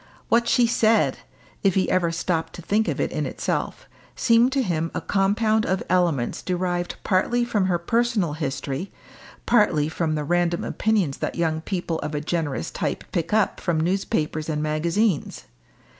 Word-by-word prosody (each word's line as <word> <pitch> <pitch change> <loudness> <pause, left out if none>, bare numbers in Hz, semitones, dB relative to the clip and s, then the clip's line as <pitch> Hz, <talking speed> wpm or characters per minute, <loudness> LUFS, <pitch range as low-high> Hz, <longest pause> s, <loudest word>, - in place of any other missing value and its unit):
What 235 0 +3
she 240 +1 +4
said, 230 -1 +2 0.4
if 195 -3 +2
he 190 - +2
ever 175 -2 +2
stopped 165 -1 -2
to 175 - -9
think 215 +5 +1
of - - -2
it - - 0
in - - -2
itself, - - -3 0.3
seemed 235 +1 +4
to 275 -2 +2
him 165 -5 -1
a - - 0
compound 215 +3 +2
of 190 -2 -1
elements 170 -9 +1
derived 175 -1 -2
partly 240 +6 +1
from 205 -5 +1
her 180 -2 +2
personal 215 -2 0
history, 140 +2 -4 0.5
partly 180 -11 +3
from 160 -1 -1
the 150 - -2
random 175 +2 +1
opinions 205 -10 0
that - - -3
young 160 -2 0
people 175 -2 -3
of 150 - -4
a - - 0
generous 150 - -2
type - - -3
pick 165 -1 -2
up 215 -1 +2
from 170 -3 0
newspapers 160 -3 -1
and 150 -1 -1
magazines. 165 +4 0
175 Hz, 165 wpm, -24 LUFS, 160-210 Hz, 0.5 s, she